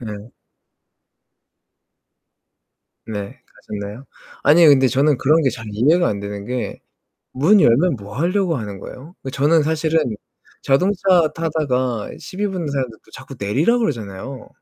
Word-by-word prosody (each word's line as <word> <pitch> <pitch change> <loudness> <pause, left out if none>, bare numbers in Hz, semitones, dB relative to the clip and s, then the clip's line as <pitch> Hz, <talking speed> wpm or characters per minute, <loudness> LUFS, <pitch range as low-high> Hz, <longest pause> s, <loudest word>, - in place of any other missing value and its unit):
네. 105 0 -8 2.8
네. 100 -3 -6
가셨나요? 105 +5 -8 0.4
아니 165 +3 +6
근데 135 -3 +6
저는 140 +2 +2
그런 155 +4 +3
게 135 - +2
잘 110 -2 -8
이해가 150 +12 +3
안 100 - -3
되는 100 0 -6
게 125 +3 -4 0.6
문 195 +10 +5
열면 145 +2 +3
뭐 100 +1 -10
하려고 180 +2 +1
하는 105 -4 -6
거예요? 140 - -11
그 135 - -6
저는 150 +5 +3
사실은 155 -4 0 0.5
자동차 180 +8 +1 0.3
타다가 130 -8 -1
시비 200 +2 -4
붙는 180 -5 -4
사람들 130 -5 -3
또 - - -23
자꾸 135 0 -11
내리라고 140 - +1
그러잖아요. 120 - -4
135 Hz, 270 characters per minute, -20 LUFS, 110-160 Hz, 2.8 s, 아니